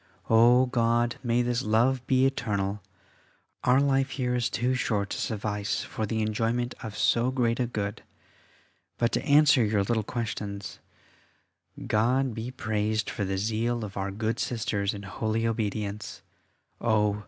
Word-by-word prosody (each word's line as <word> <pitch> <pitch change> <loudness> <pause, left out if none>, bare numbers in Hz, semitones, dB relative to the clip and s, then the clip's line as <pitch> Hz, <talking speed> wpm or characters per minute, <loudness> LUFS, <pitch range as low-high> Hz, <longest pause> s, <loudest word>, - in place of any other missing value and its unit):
O 120 +3 +6
God! 120 -1 +1
may 120 0 +1
this 120 0 0
love 120 +3 +2
be 130 0 +4
eternal: 105 -6 -1 0.8
our 125 +2 +4
life 135 -1 +2
here 125 -3 -2
is 120 -1 0
too 125 +3 0
short 105 -5 -1
to - - -3
suffice 105 -1 -2
for 110 - -4
the 110 +1 -1
enjoyment 115 +3 -1
of 110 -2 -7
so 120 +2 +2
great 120 -2 0
a 125 - +1
good! 105 -2 -4 1.0
But 120 0 +1
to - - -1
answer 145 -3 +5
your 105 -2 +1
little 110 +2 0
questions. 105 -3 -5 1.1
God 125 +4 +1
be 115 +2 -5
praised 110 -3 -1
for 100 - -2
the 95 0 -2
zeal 115 +3 -1
of 100 - -9
our 100 0 -2
good 110 +4 -2
Sisters 105 -4 -1
in 100 - -8
holy 110 +3 -2
obedience. 105 -2 -3 0.6
Oh! 105 -3 +1
115 Hz, 150 wpm, -27 LUFS, 105-125 Hz, 1.1 s, O